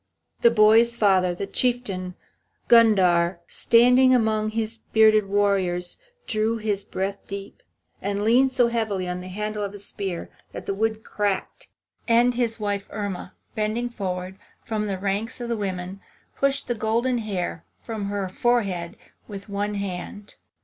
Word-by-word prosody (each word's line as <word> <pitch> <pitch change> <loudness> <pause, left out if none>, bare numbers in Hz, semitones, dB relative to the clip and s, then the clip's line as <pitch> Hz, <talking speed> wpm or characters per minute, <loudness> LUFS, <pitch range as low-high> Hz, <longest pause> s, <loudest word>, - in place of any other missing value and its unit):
The 235 - +7
boy's 230 +1 +5
father, 190 -5 +3
the 195 - -4
Chieftain 200 -6 -1 0.5
Gundhar, 185 -7 +5
standing 250 +2 +5
among 215 -2 +1
his 225 0 -3
bearded 215 -2 +5
warriors, 195 -3 0 0.3
drew 220 +1 0
his 210 -3 -2
breath 195 +1 -3
deep, 200 0 -8 0.4
and 200 +1 -2
leaned 250 +4 +4
so 250 -2 +3
heavily 215 -6 -1
on 180 0 -4
the 180 - -8
handle 210 +2 -4
of 200 0 -4
his 205 0 -6
spear 190 -5 -5 0.2
that - - -7
the 195 - -1
wood 220 +2 -1
cracked. 205 -2 -2 0.4
And 240 +1 +4
his 235 -2 -1
wife, 205 -1 -2
Irma, 200 -3 -5 0.2
bending 220 +3 -1
forward 185 -3 -5 0.3
from 215 -2 -2
the 195 -2 -2
ranks 200 +6 -2
of 235 -1 -2
women, 190 -2 -4 0.3
pushed 275 0 0
the 240 - 0
golden 235 +3 0
hair 185 -6 -3 0.2
from 220 -3 -4
her 200 -1 -2
forehead 190 -5 -1 0.3
with 200 0 -9
one 205 +1 -2
hand. 200 +1 -6
210 Hz, 145 wpm, -24 LUFS, 195-230 Hz, 0.5 s, The